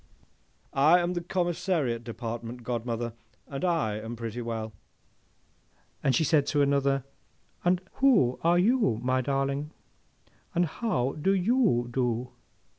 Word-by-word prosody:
'—'I 150 +6 +6
am 175 +1 0
the 175 - -2
Commissariat 170 - -1
Department, 115 +1 -6
godmother, 120 -1 -3 0.3
and 135 +2 -6
I 155 - +1
am 115 +2 -6
pretty 115 +1 -5
well! 110 -2 -4 1.3
Then 135 - +2
she 160 - +2
said 145 -1 +3
to 145 -1 +2
another, 140 -1 +2 0.9
'Who 225 - +4
are 170 +1 +4
you, 205 - +3
my 130 +1 +2
darling, 135 +2 -1 0.9
and 175 +1 +3
how 145 - -1
do 195 +5 +3
you 195 - +2
do? 125 0 -1
135 Hz, 120 wpm, -28 LUFS, 120-175 Hz, 1.3 s, I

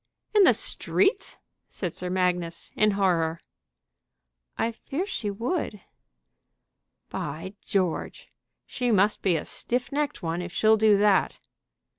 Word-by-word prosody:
in 420 - +6
the - - +7
streets?" 390 0 0 0.3
said 180 -4 -4
Sir 180 - -5
Magnus, 180 -2 -1
in 215 - +4
horror. 165 -4 +1 1.2
"I 225 +1 0
fear 285 +9 -4
she 230 - -3
would." 230 - -2 1.3
"By 155 +6 -5
George! 185 -4 -2 0.4
she 245 -1 -2
must 210 -1 +3
be 185 -3 +2
a 155 - -2
stiff 245 +1 -3
necked 290 -7 -2
one 165 +1 -2
if 180 0 -6
she'll 220 +4 +4
do 215 -1 +5
that." 205 -2 +3
200 Hz, 125 wpm, -26 LUFS, 180-235 Hz, 1.3 s, the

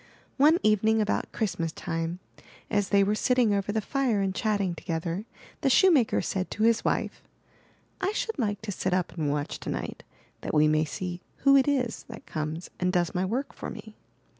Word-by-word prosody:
One 300 +4 +6
evening 215 +1 +3
about 210 -1 0
Christmas 175 -7 -2
time, 165 +1 -3 0.5
as 205 -2 +1
they 200 0 +5
were 200 +2 +1
sitting 240 0 +2
over 200 0 0
the 220 +1 0
fire 255 -2 0
and 195 -1 0
chatting 200 -3 0
together, 170 +4 -3 0.4
the 275 - +2
shoemaker 295 - +4
said 190 -2 -2
to 215 - -2
his 230 0 +3
wife: - - -1 0.8
"I 385 +1 +1
should 450 - -3
like 210 -3 -1
to 215 - -3
sit 185 -1 -1
up 185 -2 -1
and 155 -4 -1
watch 145 0 -2
tonight, - - -5 0.4
that - - -3
we 150 0 +5
may 155 +1 +2
see 180 +3 -5 0.2
who 275 0 +7
it 270 0 +5
is 255 -5 0
that - - -10
comes 155 +2 -4
and 180 0 +1
does 175 -2 +1
my 180 - 0
work 245 +8 -2
for - - -6
me.'' - - -10
205 Hz, 190 wpm, -27 LUFS, 175-235 Hz, 0.8 s, who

